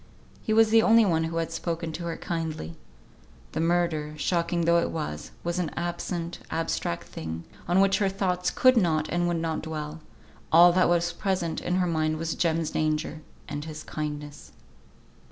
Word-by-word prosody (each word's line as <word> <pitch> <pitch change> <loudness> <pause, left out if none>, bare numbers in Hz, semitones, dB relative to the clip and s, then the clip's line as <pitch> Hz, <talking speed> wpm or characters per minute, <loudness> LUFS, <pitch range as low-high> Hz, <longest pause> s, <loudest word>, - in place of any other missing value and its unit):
He 220 - -3
was 220 0 +5
the 225 0 +7
only 225 0 +6
one 165 -4 +2
who 165 +1 -3
had 165 0 -1
spoken 165 0 -3
to 170 +2 -6
her 170 - -3
kindly. 160 - -4 0.8
The - - -3
murder, 165 -3 0
shocking 170 +2 0
though 170 +1 +4
it - - 0
was, 115 - -4
was 175 +1 -1
an 175 - -1
absent, 175 0 -3
abstract 160 - -2
thing, 80 +1 -6 0.2
on 175 +2 +3
which 195 +1 +3
her 200 -2 +2
thoughts 185 -2 0
could 255 0 +4
not, 160 -6 +2
and 175 0 +1
would 175 -1 0
not 165 -1 -2
dwell; 155 0 -5 0.5
all 175 +2 +8
that 185 -1 +4
was 175 0 +2
present 180 -2 -1
in 180 - -1
her 185 -1 +2
mind 155 -2 0
was 165 +1 -2
Jem's 165 -2 0
danger, 155 0 -1 0.3
and 145 0 -4
his 155 -1 -7
kindness. 150 -1 -6
165 Hz, 175 wpm, -27 LUFS, 155-175 Hz, 0.8 s, all